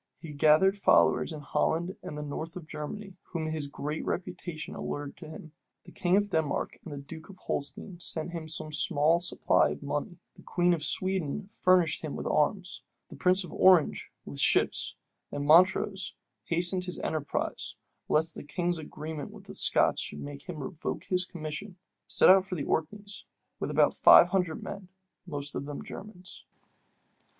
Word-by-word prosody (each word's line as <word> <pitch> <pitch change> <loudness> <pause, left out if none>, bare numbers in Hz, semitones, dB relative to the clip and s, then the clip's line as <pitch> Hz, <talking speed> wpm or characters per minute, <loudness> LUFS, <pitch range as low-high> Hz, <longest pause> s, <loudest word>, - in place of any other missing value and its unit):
He 160 -3 -9
gathered 155 +7 +4
followers 200 - +3
in 155 -2 -7
Holland 170 +4 -1
and 150 - -7
the 150 - -4
north 160 +4 -6
of 180 -3 -8
Germany 180 +6 -7 0.2
whom 165 -2 -2
his 155 -2 -3
great 150 +2 -4
reputation 175 -3 -5
allured 145 -1 -5
to - - -10
him. 160 0 -10 0.3
The - - -14
king 180 +1 +2
of 205 0 0
Denmark 160 -4 -1
and 140 -1 -8
duke 160 +3 -10
of 195 - -12
Holstein 170 - -4
sent 170 0 0
him 165 -2 -6
some 155 0 -2
small 150 +2 +3
supply 175 - +2
of - - -6
money; - - -3 0.2
the - - -17
queen 175 0 +1
of 160 -3 -2
Sweden 185 +1 -1
furnished 185 -5 +2
him 155 -3 -5
with - - -5
arms; 180 +5 0 0.3
the - - -10
prince 185 +1 +2
of 175 - -10
Orange 185 -5 +4
with 70 -1 -8
ships; - - +2 0.4
and 145 0 -3
Montrose, 185 +4 +4 0.3
hastening 175 +2 +3
his 180 0 -3
enterprise, 155 -3 -3 0.3
lest 160 +1 +3
the - - -6
king's 175 +3 -2
agreement 155 -1 -7
with - - -13
the - - -10
Scots - - +3
should 75 - -3
make 70 0 -9
him - - -5
revoke - - -5
his 185 -1 0
commission, 175 +4 -7 0.3
set - - +4
out 190 0 +7
for 185 - -4
the 150 - -3
Orkneys 200 +6 -3 0.3
with - - -3
about - - +3
five 175 - +8
hundred 180 -4 -1
men, 200 -2 -7 0.4
most 145 -3 -4
of - - -4
them 145 - -6
Germans. 185 -3 -10
165 Hz, 170 wpm, -29 LUFS, 150-185 Hz, 0.4 s, five